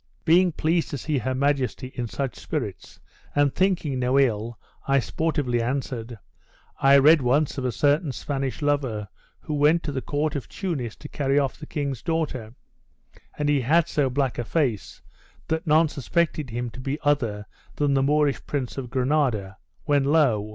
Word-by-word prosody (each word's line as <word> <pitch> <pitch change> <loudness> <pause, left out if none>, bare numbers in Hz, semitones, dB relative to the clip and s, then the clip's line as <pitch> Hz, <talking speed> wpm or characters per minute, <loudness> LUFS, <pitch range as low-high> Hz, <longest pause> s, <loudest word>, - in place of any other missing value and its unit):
Being 175 +2 +5
pleased 165 +2 0
to 145 - -4
see 145 +1 -1
her 130 +2 -2
majesty 135 -2 0
in 120 -1 -3
such 135 +2 -3
spirits, - - -5 0.4
and 145 -1 +3
thinking 175 -8 0
no 125 +2 +2
ill, 115 -3 0 0.3
I 140 0 +3
sportively 135 -1 0
answered, 120 -2 -3 0.6
'I 135 +1 +7
read 150 +2 +6
once 135 +3 +1
of 130 - -3
a 125 - +1
certain 145 - +2
Spanish 135 +1 -3
lover, 130 -8 0 0.3
who 155 - -5
went 150 +3 +3
to 150 - -3
the 135 -2 -3
court 150 +2 -1
of 140 - -4
Tunis 145 - -4
to 150 - -10
carry 140 -1 0
off 140 -2 +1
the 150 - -9
king's 140 -5 -3
daughter; 145 -9 -2 0.8
and 150 - -1
he 145 -2 +3
had 160 +7 +3
so 145 -5 +1
black 130 -2 -1
a - - 0
face, 125 - -2 0.5
that 160 +2 -1
none 155 +2 +5
suspected 155 0 -1
him 120 +1 -4
to 130 - -11
be 135 +2 -3
other 115 -9 0 0.3
than 145 -1 +1
the 135 - +3
Moorish 145 -2 +2
Prince 135 -2 -3
of 125 -3 -6
Granada; 125 -7 0 0.3
when 145 -3 +2
lo! 135 -9 +2
140 Hz, 170 wpm, -25 LUFS, 125-150 Hz, 0.8 s, I